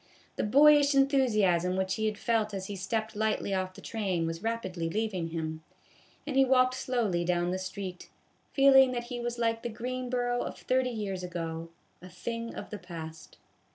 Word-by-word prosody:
The - - -1
boyish 285 +4 +6
enthusiasm 215 - +3
which 190 0 0
he 220 +2 0
had 210 -1 -2
felt 215 -2 0
as 190 -1 -4
he 205 - -5
stepped 220 +3 -3
lightly 215 -2 0
off 185 -1 -2
the - - -11
train 190 -7 -1
was 165 +1 -4
rapidly 190 -7 -2
leaving 200 -3 -2
him, 160 -1 -4 0.6
and 290 -2 -4
he 270 - +6
walked 255 -1 +4
slowly 235 -9 0
down 175 0 0
the 185 - -2
street, 185 -1 -6 0.4
feeling 270 -2 +6
that 240 -1 -2
he 240 - -3
was 240 0 -3
like 230 -1 0
the 240 - -3
Greenboro 245 +1 -2
of - - -5
thirty 255 0 +1
years 205 -5 -4
ago, 165 -2 -5 0.3
a 180 - -11
thing 230 +5 -5
of - - -8
the 210 - -5
past. 160 -3 -9
215 Hz, 180 wpm, -29 LUFS, 180-245 Hz, 0.6 s, boyish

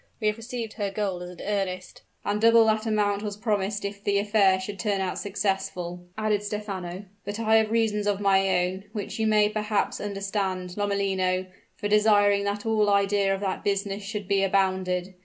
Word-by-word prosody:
We 220 - -4
have 210 +1 +2
received 230 -1 -5
her 205 -3 -2
gold 195 -3 -2
as 180 - -6
an 180 - -11
earnest 190 -3 -3
" - - -40
"And 205 +1 0
double 230 0 +6
that 220 +1 +1
amount 205 -2 +1
was 210 -1 -4
promised 210 -2 -1
if 200 0 -6
the 200 0 +2
affair 200 -2 +3
should 195 +1 -6
turn 200 +1 0
out 190 -1 -2
successful," 190 -3 -2 0.2
added 215 -1 +1
Stephano. 200 -3 -5 0.2
"But 205 +2 -5
I 220 -1 +4
have 220 -1 +2
reasons 215 -2 +1
of 205 -1 +1
my 195 -2 +3
own, 190 +2 -5
which 210 0 -5
you 220 - +2
may 210 -1 +4
perhaps 210 -1 -1
understand, 195 -3 -3
Lomellino, 195 -2 0 0.3
for 205 - -3
desiring 205 -1 +4
that 205 +1 -2
all 215 -2 +2
idea 200 0 +2
of 195 0 -1
that 190 -2 -2
business 200 0 -1
should 205 -1 -5
be 195 0 +2
abandoned. 190 -1 0
200 Hz, 190 wpm, -26 LUFS, 195-210 Hz, 0.3 s, double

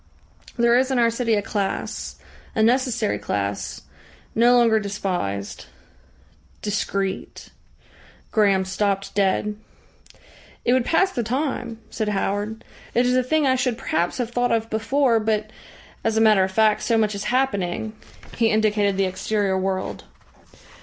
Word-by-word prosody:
There 235 0 +4
is 260 +1 +3
in 265 - 0
our 235 -1 +4
city 230 -1 +1
a 205 - 0
class, 200 -2 -3 0.4
a 220 - +3
necessary 240 -2 +1
class, 100 0 -3 0.5
no 240 +2 +5
longer 230 -2 +4
despised 180 - -3 1.0
discreet 195 -2 -3 0.4
" - - -27
Graham 200 -4 +3
stopped 195 +1 -1
dead. 205 +1 +1 1.1
"It 245 - +4
would 255 -2 +2
pass 380 +4 +3
the 245 - -2
time," 245 -1 -2
said 220 -2 -2
Howard. 205 +2 -2 0.3
"It 245 +1 +4
is 250 0 +2
a 255 - +4
thing 300 +4 +1
I 260 - +4
should 250 -2 0
perhaps 175 +1 -1
have 240 -2 -2
thought 245 0 +1
of 225 0 0
before, 230 +2 +2
but, 215 0 -1 0.5
as 225 0 0
a - - +4
matter 215 -3 +5
of 190 - -1
fact, 215 +1 +3
so 230 - +1
much 215 -1 +2
is 200 0 -5
happening 220 -5 0 0.2
" - - -16
He 230 -1 +3
indicated 210 -2 +2
the 195 - +2
exterior 195 +1 -1
world. 190 0 -2
220 Hz, 150 wpm, -23 LUFS, 200-240 Hz, 1.1 s, no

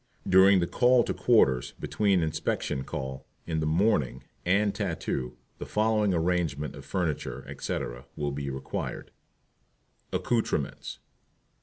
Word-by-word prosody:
During 95 0 +6
the - - +2
"Call 125 +5 +4
to - - -2
Quarters," 70 - +3
between 100 -5 +1
"Inspection 75 -3 -1
Call" 65 0 -6 0.2
in 80 -2 -1
the 80 - 0
morning 80 - +1 0.2
and 100 +2 +3
"Tattoo," 85 - -3 0.2
the - - -5
following 105 -1 +2
Arrangement 85 -4 0
of - - -11
Furniture, 75 -7 -2
etc., - - -4
will 75 -1 -2
be 70 0 -4
required: 65 0 -5 1.0
ACCOUTREMENTS. 110 - -1
85 Hz, 120 wpm, -28 LUFS, 70-100 Hz, 1.0 s, During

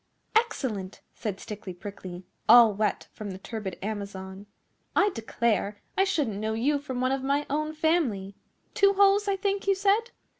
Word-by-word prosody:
'Excellent!' 260 - 0
said 205 -3 -4
Stickly 200 -3 -7
Prickly, 185 -2 -8 0.2
all 230 -2 +9
wet 210 +2 -1
from 210 -1 -6
the 185 - -6
turbid 200 -2 -6
Amazon. 200 -2 -6 0.5
'I 410 0 +4
declare, 220 - -1 0.2
I 385 - +4
shouldn't 260 - 0
know 220 +1 -1
you 285 +6 +1
from 260 -3 -4
one 255 +1 +2
of 270 0 0
my 280 +2 0
own 305 +1 -1
family. 285 - +1 0.4
Two 395 0 +4
holes, 400 +1 +4
I 395 - +2
think, 395 0 -1
you 395 - +4
said? 410 +4 +2
235 Hz, 160 wpm, -27 LUFS, -, 0.5 s, all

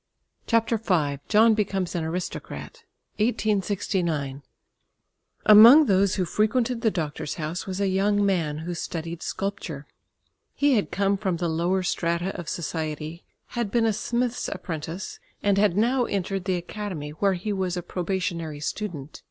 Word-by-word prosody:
CHAPTER 230 -1 +2
V 155 -10 0
JOHN 220 +1 +5
BECOMES 195 -4 -1
AN 170 - -1
ARISTOCRAT 180 - -6 0.3
(1869) 190 - 0 1.0
Among 230 +9 +9
those 195 -3 +3
who 185 - 0
frequented 230 +6 +1
the 225 - +3
doctor's 155 -6 -3
house 160 +3 -4
was 190 0 -4
a 200 - +1
young 200 +2 +2
man 165 -6 0
who 175 - -3
studied 165 0 -5
sculpture. 175 -7 -4 0.7
He 285 -1 +3
had 210 -5 +1
come 200 0 +1
from 190 -4 -1
the 175 0 -1
lower 175 +4 0
strata 170 +1 -1
of 170 - -6
society, 160 0 -4 0.3
had 235 -4 -2
been 230 +1 +2
a 220 - +2
smith's 240 +3 -1
apprentice, 165 +2 -5 0.2
and 200 -1 +3
had 200 -3 +3
now 245 +3 +3
entered 195 -2 -2
the 190 -2 +1
Academy, 175 -4 -5
where 195 +6 +1
he 195 +4 -3
was 185 -2 -1
a 175 - -3
probationary 170 -4 -3
student. 155 -3 -5
190 Hz, 145 wpm, -25 LUFS, 170-210 Hz, 1.0 s, Among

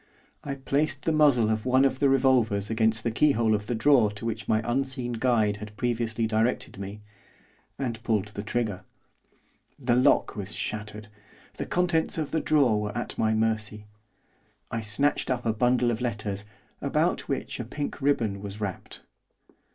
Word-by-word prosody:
I 140 -1 -4
placed 140 +1 -1
the 160 - +1
muzzle 140 -8 +4
of 110 -1 -1
one 130 +1 +4
of 130 -1 0
the 140 - +4
revolvers 125 -7 +2
against 110 0 +1
the 115 - 0
keyhole 115 -3 +3
of 105 0 -1
the 120 - -1
drawer 120 -2 +4
to 105 +2 -8
which 115 -1 -3
my 110 0 +2
unseen 130 0 -1
guide 110 -3 +2
had 105 0 -10
previously 115 -2 -1
directed 110 -1 0
me, 100 +2 -7 0.8
and 120 -5 -3
pulled 105 -3 0
the 105 -1 -6
trigger. 105 -3 -2 0.9
The 125 -3 +1
lock 125 - +3
was 105 -1 -4
shattered, 105 0 -4 0.5
the - - -4
contents 175 -3 +1
of 155 -3 -2
the 160 - 0
drawer 125 -9 +3
were 105 0 -4
at - - -4
my 110 0 +2
mercy. 110 -1 -1 0.9
I 115 - -2
snatched 110 +9 0
up 125 -1 -1
a 115 - +2
bundle 125 +1 +2
of 115 +1 -3
letters, 105 -4 -3 0.4
about - - 0
which - - -3
a - - -2
pink 145 -1 -5
ribbon 115 -8 +1
was 100 +1 -7
wrapped. 100 -3 -5
115 Hz, 165 wpm, -27 LUFS, 105-130 Hz, 0.9 s, muzzle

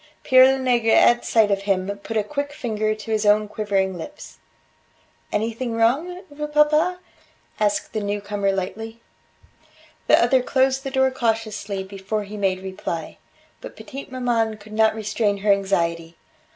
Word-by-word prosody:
Pere 260 -1 +7
Lenegre 240 -4 +2
at 240 0 +5
sight 220 -3 +3
of 195 0 +1
him, 195 0 -1
put 225 +2 -4
a 215 - +2
quick 285 +5 -4
finger 215 -5 -2
to 215 +1 -8
his 215 -1 +1
own 210 0 +3
quivering 200 -3 -1
lips. 295 - -10 0.9
"Anything 230 +3 -2
wrong, 285 +11 0
vieux 300 +1 -5
papa?" 300 +4 +3 0.6
asked 205 -1 0
the 215 - -2
newcomer 205 -1 -1
lightly. 215 +4 -5 1.1
The - - +6
other 260 -1 +3
closed 265 +1 +1
the 270 - -3
door 265 0 +2
cautiously 220 -5 -2
before 195 +2 -4
he 205 +1 -9
made 190 -2 -1
reply. 180 -4 -5 0.4
But - - -9
petite 275 0 -9
maman 235 -4 0
could 215 +1 -14
not 220 0 +3
restrain 210 -1 -1
her 205 +1 +2
anxiety. 170 -4 0
215 Hz, 150 wpm, -22 LUFS, 200-255 Hz, 1.1 s, Pere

